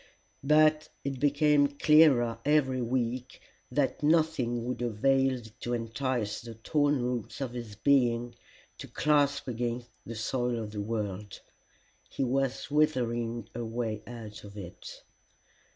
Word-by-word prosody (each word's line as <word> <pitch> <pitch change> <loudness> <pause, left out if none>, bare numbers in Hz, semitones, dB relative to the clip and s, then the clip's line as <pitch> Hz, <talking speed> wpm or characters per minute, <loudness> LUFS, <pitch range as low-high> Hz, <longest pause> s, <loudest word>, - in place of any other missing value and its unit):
But 155 +1 +4
it 135 -2 -3
became 145 0 +4
clearer 140 -8 +5
every 140 -3 +2
week 125 +1 -2 0.3
that - - 0
nothing 150 -7 +2
would 125 0 -3
avail 130 +3 +2 0.2
to 120 0 -2
entice 115 -1 -2
the 115 -1 -9
torn 145 +3 +1
roots 125 -2 -3
of 130 -3 -3
his 120 -4 -7
being 120 -1 +2 0.5
to - - -7
clasp 145 -2 +1
again 120 0 -2 0.2
the 115 - -7
soil 120 +2 -1
of 110 -2 -5
the 105 -1 -4
world: 105 -2 -4 0.7
he - - -2
was 135 +2 -1
withering 120 -6 0
away 115 -2 -3
out 110 -3 -9
of 100 0 -11
it. 90 -3 -9
125 Hz, 125 wpm, -29 LUFS, 115-140 Hz, 0.7 s, clearer